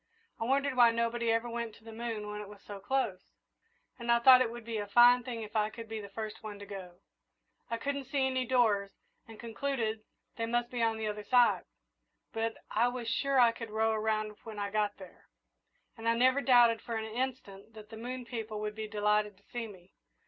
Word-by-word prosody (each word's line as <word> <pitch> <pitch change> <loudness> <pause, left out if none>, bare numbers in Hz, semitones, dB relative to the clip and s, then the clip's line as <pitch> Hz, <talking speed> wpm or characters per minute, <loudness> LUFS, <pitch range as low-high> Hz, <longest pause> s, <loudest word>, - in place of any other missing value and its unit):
I 225 - -1
wondered 275 +2 +1
why 240 -2 +7
nobody 230 0 0
ever 230 +1 +1
went 235 -2 -4
to - - -20
the 225 - -10
moon 225 -2 -4
when 210 0 -5
it 205 - -9
was 205 -1 -14
so 205 -1 -8
close, 205 -3 -1 0.8
and 235 0 0
I 235 - +6
thought 255 +1 +8
it 245 - +2
would 235 -1 -9
be 230 -2 -3
a 205 - -4
fine 240 +4 +7
thing 235 -2 -5
if 210 0 -10
I 210 -1 +2
could 230 +1 -9
be 220 -1 -5
the 200 - -9
first 215 +1 -6
one 210 -2 -7
to 200 - -9
go. 185 -3 -9 0.7
I 230 - -1
couldn't 280 +3 -3
see 270 +1 0
any 260 -1 0
doors, 225 -6 +2 0.4
and 225 -1 -12
concluded 230 -2 -2 0.4
they 230 0 -1
must 240 +1 0
be 245 -2 -2
on 225 -1 +2
the 220 - -3
other 210 0 -4
side; 245 +3 +4 0.7
but 225 0 -2
I 230 +3 +3
was 245 -1 -4
sure 275 +3 +1
I 240 -2 +7
could 230 -1 -8
row 220 +1 +1
around 215 -1 -1
when 220 -2 -8
I 200 0 -3
got 210 -1 0
there, 190 -2 -14 0.7
and 230 0 -2
I 230 - +3
never 260 +3 +4
doubted 240 -4 +5
for 235 - -5
an 220 0 -2
instant 225 -3 -5
that 215 -1 -11
the - - -7
moon 245 +2 -6
people 220 -3 -5
would 210 0 -3
be 215 0 -5
delighted 210 -1 +1
to 200 - -27
see 240 -2 -4
me. 185 -3 -15
225 Hz, 220 wpm, -31 LUFS, 210-240 Hz, 0.8 s, thought